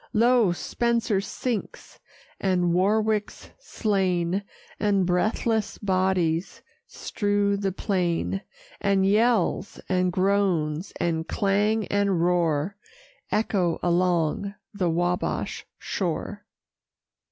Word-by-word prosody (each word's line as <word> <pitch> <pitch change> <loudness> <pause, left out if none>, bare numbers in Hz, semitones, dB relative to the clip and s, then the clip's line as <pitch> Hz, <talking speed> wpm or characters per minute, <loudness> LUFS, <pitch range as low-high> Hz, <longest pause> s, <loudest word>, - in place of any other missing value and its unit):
Lo! 235 -3 +4
Spencer 230 +2 0
sinks, 225 +2 -5 0.4
and 180 -3 +1
Warwick's 210 +3 0
slain, 190 - 0 0.4
And 200 -3 +2
breathless 215 +4 0
bodies 185 -3 0 0.2
strew 205 -1 0
the 200 -1 -1
plain: 185 -1 -1 0.4
And 195 -1 +2
yells, 210 -1 +2
and 185 -1 +1
groans, 185 -3 +1
and 165 -1 -1
clang, 205 +2 +1
and 200 -3 +1
roar, 170 +1 +1 0.5
Echo 190 -6 +1
along 175 +2 +1 0.2
the 185 -4 0
Wabash 175 +2 -1
shore. 205 +3 -4
195 Hz, 85 wpm, -25 LUFS, 175-205 Hz, 0.5 s, Lo